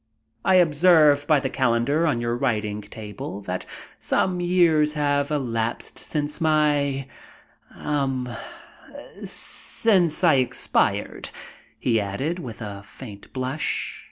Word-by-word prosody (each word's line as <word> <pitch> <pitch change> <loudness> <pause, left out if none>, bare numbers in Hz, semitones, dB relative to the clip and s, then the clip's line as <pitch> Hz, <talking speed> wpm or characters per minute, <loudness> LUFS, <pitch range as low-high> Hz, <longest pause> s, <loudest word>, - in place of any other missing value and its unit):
"I 190 - +4
observe 155 -3 +5
by 155 -2 +5
the 135 - -2
calendar 130 +6 +1
on 125 -7 +1
your 120 0 -1
writing 105 -3 -1
table 105 -1 -8
that 90 -2 -5 0.3
some 185 -1 +1
years 170 -4 +3
have 145 -1 +1
elapsed 120 -6 -2
since 150 0 -3
my 145 -3 +2 0.7
um 135 -4 -1 1.0
since 190 -7 0
I 170 - +6
expired," 125 -1 0 0.5
he 115 -3 +1
added, 130 - -3
with 120 -6 -7
a 100 -1 -7
faint 100 0 -12
blush. 130 +3 -2
140 Hz, 110 wpm, -24 LUFS, 115-155 Hz, 1.0 s, I